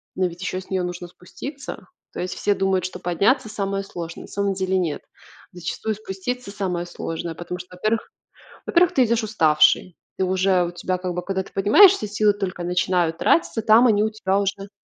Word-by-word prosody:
но 185 - +1
ведь 175 +1 -10
еще 185 0 -2
с - - -17
нее 190 -2 0
нужно 175 0 -5
спуститься. 275 - -9 0.3
То - - -6
есть 180 0 -3
все 205 - +1
думают, 190 -1 +1
что 185 0 -5
подняться 215 - +1
самое 195 -1 -3
сложное. 170 -3 -7
На - - -12
самом 200 -1 -1
деле 190 0 0
нет. 170 -5 -1 0.5
Зачастую 180 +5 -3
спуститься 215 +3 -5
самое 180 -4 -2
сложное, 165 -1 -5
потому 175 +1 -6
что 180 0 -11
во-первых 215 +4 -1 0.5
во-первых 355 +1 +3
ты 255 -2 +4
идешь 230 0 +1
уставший. 165 -3 +3 0.2
Ты 190 - 0
уже 185 -1 +2
у 175 - -4
тебя 185 +1 -2
как 180 0 -4
бы, 180 - -3
когда 190 +1 -2
ты - - -16
поднимаешься 215 - +6
силы 210 0 +3
только 190 -3 -4
начинают 175 -1 +1
тратиться, 245 -8 +2
там 230 +3 +6
они 210 -1 +3
у 220 - +1
тебя 200 -3 0
уже 195 0 -3
190 Hz, 195 wpm, -23 LUFS, 180-215 Hz, 0.5 s, поднимаешься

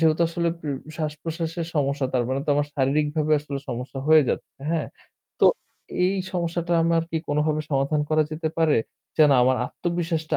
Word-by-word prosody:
যেহেতু 160 0 +3
আসলে 170 0 -1
পু 155 - -6 0.3
শ্বাস-প্রশ্বাসের 160 +2 -3
সমস্যা 140 -2 +1
তার 125 -2 +2
মানে 130 +1 0
তো - - -15
আমার 145 0 +1
শারীরিকভাবে 150 +3 +1
আসলে 145 -1 -5
সমস্যা 125 +3 -5
হয়ে 155 -1 +8
যাচ্ছে। - - -3 0.2
হ্যাঁ, 165 -3 -1 0.5
তো - - +7 0.6
এই 190 - +1 0.2
সমস্যাটা 170 -1 -1
আমার 165 0 +3
কি 165 - -1
কোনভাবে 150 +1 +1
সমাধান 140 +2 +1
করা 155 0 +4
যেতে 160 +1 -2
পারে? 160 -2 +4 0.4
যেন 150 -2 +7
আমার 130 +1 +3
আত্মবিশ্বাসটা 170 -2 -2
155 Hz, 160 wpm, -24 LUFS, 145-165 Hz, 0.6 s, হয়ে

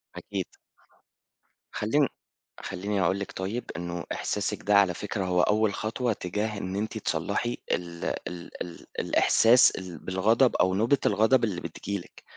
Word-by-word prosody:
أكيد. - - -4 1.3
خلّين 135 +7 +2 0.5
خلّيني 100 +1 -2
أقول 95 +2 +2
لِك 100 - -5
طيب 100 +6 -3
إنه 85 0 -4
إحساسِك 105 -1 -2
ده 105 - +3
على 95 -3 +4
فكرة 100 +1 -3
هو 90 -1 +2
أول 105 0 +2
خطوة 115 +3 -1
تجاه 105 +3 -3
إن 95 -1 -4
أنتِ 110 +2 -2
تصلّحي - - -1
ال 85 -1 -3 0.2
ال 90 -1 -8
ال 85 - -7
الإحساس 120 +3 +5
ال 90 -3 -7
بالغضب 110 +7 +2
أو 95 0 +3
نوبة 115 +8 +3
الغضب 110 +5 +4
اللي 95 -6 -1
بتيجي 100 +1 -4
لِك - - -15
100 Hz, 145 wpm, -27 LUFS, 90-110 Hz, 1.3 s, الإحساس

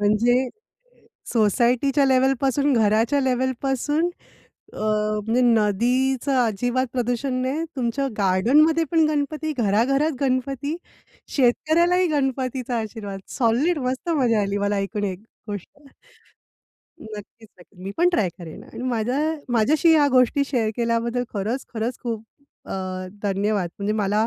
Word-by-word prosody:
म्हणजे 215 +4 +3 1.0
सोसायटीच्या 245 +5 +2
लेव्हलपासून, 270 +2 +2
घराच्या 225 +5 +2
लेव्हलपासून, 265 +5 0 0.6
अ, - - -9
म्हणजे 215 +2 0
नदीचं 245 +5 +2
अजिबात 245 +5 0
प्रदूषण 245 +1 -1
नाही, 280 +6 -1
तुमच्या 260 +2 -1
गार्डनमध्ये 275 - +3
पण 325 -1 +4
गणपती, 305 +1 -2
घराघरात 250 +9 +2
गणपती, 270 +3 -1 0.6
शेतकऱ्यालाही 335 +8 +3
गणपतीचा 260 -4 -1
आशीर्वाद. 205 -3 -6 0.2
सॉलिड! 270 +8 +2
मस्त 260 +6 -4
मजा 245 -8 +2
आली! 200 +1 -1
मला 205 0 0
ऐकून 205 +1 -2
एक 190 -1 -3 0.3
गोष्ट. 205 -3 -5 1.3
नक्कीच, 220 +1 -11
नक्कीच. 180 +1 -20
मी 195 - -4
पण 350 +1 +4
ट्राय 215 - +1
करेन. 165 -3 -9
आणि 245 - -9
माझ्या 245 +3 -1 0.3
माझ्याशी 300 +8 +4
ह्या 295 -2 +5
गोष्टी 255 +2 +3
शेअर 230 -6 0
केल्याबद्दल 235 +1 0
खरंच-खरंच 230 +2 -3
खूप 225 -2 -4 0.4
अ, - - -6 0.5
धन्यवाद. 200 -2 0
म्हणजे 200 +1 -1
मला 210 +1 +1
245 Hz, 115 wpm, -23 LUFS, 215-275 Hz, 1.3 s, ह्या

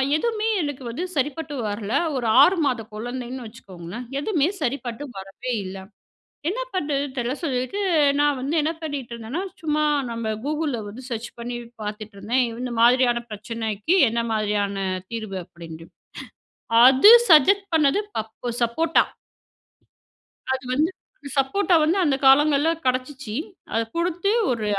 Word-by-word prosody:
எதுமே 445 +5 -1
எனக்கு 290 -3 -4
வந்து 250 +10 -4
சரிப்பட்டு 295 +2 -2 0.2
வரல. 205 0 -5 0.2
ஒரு 245 -3 -1
6 360 +7 +6
மாத 250 -4 0
குழந்தைன்னு 245 +3 -6
வச்சுக்கோங்களேன். 195 0 -9
எதுமே 315 -2 +1
சரிப்பட்டு 260 -1 -3
வரவே 195 +6 -6
இல்ல. 190 +1 -7 0.7
என்ன - - -2
பண்ணுறதுன் 285 -5 -2
தெரில 245 +1 -1
சொல்லிட்டு, 260 +5 -2 0.4
நான் 290 -2 +2
வந்து 280 +5 -2
என்ன 310 +2 0
பண்ணிட்டுருந்தன்னா, 255 -1 -5 0.2
சும்மா 305 -1 0 0.3
நம்ம 225 -1 -3
கூகுள்ல 300 -4 -1
வந்து 225 +6 -9
சர்ச் 230 0 -4
பண்ணி 240 +1 -4 0.3
பார்த்துட்ருந்தேன் 215 +3 -2 0.2
இந்த 250 -1 -4
மாதிரியான 240 0 +4
பிரச்சனைக்கி 220 - -2
என்ன 235 +1 -1
மாதிரியான 205 -2 -1 0.3
தீர்வு 215 -4 -4
அப்பிடின்ட்டு. 165 -1 -11 1.0
அது 265 +11 +8 0.2
சஜெஸ்ட் 390 +6 +6
பண்ணது 300 +4 +3 0.2
பப்பு 220 +2 -5
சப்போட்டா. 320 +8 +2 1.5
அது 260 0 -5
வந்து, 305 +6 +2 0.5
சப்போட்டா 360 +8 +2
வந்து 320 +5 +2
அந்த 290 -6 +2
காலங்கள்ல 290 +2 +5 0.2
கிடைச்சிச்சி. 255 -2 -2 0.4
அத 225 - +1 0.2
குடுத்து 350 +3 0 0.2
ஒரு 230 -3 -1
255 Hz, 125 wpm, -23 LUFS, 225-300 Hz, 1.5 s, அது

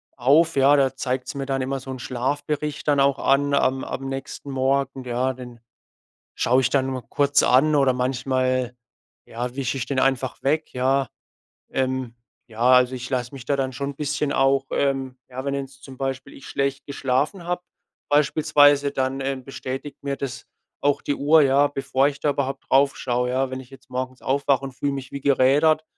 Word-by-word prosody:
auf, 145 +6 +3
ja. 140 +1 +5
Da 135 -1 +2
zeigt's 130 0 -3
mir 135 - -3
dann 135 -1 -1
immer 135 +1 -2
so 135 - -7
'n 130 - -6
Schlafbericht 145 +5 -3
dann 145 -1 +3
auch 140 0 +2
an 140 +1 +2
am 135 -1 +2
am 135 - -5
nächsten 135 +1 -6
Morgen, 135 0 0
ja. 125 +1 -1
Den 125 -2 -11 0.8
schaue 125 +3 +3
ich 125 - +1
dann 135 -2 +2
mal 130 -2 -4
kurz 145 0 +2
an 150 +5 +4
oder 135 -3 +4
manchmal, 130 0 0 0.5
ja, 120 +2 -5
wische 135 -1 -2
ich 130 - -3
den 135 -2 -1
einfach 130 -1 0
weg, 155 +3 0
ja. 130 +1 +1 0.6
Ähm, 130 -2 -1 0.3
ja, 115 0 -10
also 125 0 +5
ich 125 +1 -6
lasse 125 0 -2
mich 130 -3 -9
da 140 - +1
dann 130 -1 -2
schon 140 +2 -3
'n - - -14
bisschen 150 0 -1
auch, 135 0 +3
ähm 135 -2 -1
ja, 130 +1 -6
wenn 140 - -1
jetzt 135 -1 -7
zum 130 -2 -11
Beispiel 135 0 -4
ich 135 - -13
schlecht 140 0 -2
geschlafen 140 +6 -1
habe 180 +1 -2 0.5
beispielsweise, 145 -1 +4
dann, 135 0 -1
äh, 135 0 -1
bestätigt 135 +2 -6
mir 140 -1 -2
das 135 -2 -5 0.4
auch 145 -1 +2
die 145 - -1
Uhr, 150 +2 +5
ja, 140 +1 +4
bevor 135 -1 +1
ich 140 -1 -4
da 145 - +1
überhaupt 140 -1 -3
draufschaue, 130 -3 +2
ja. 130 +1 0
Wenn 130 - -4
ich 125 - -12
jetzt 135 -1 -16
morgens 130 0 -4
aufwache 140 0 +1
und 135 - -6
fühle 140 +2 -2
mich 135 -2 -6
wie 140 - -6
gerädert. 140 +4 +3
135 Hz, 190 wpm, -23 LUFS, 130-140 Hz, 0.8 s, ja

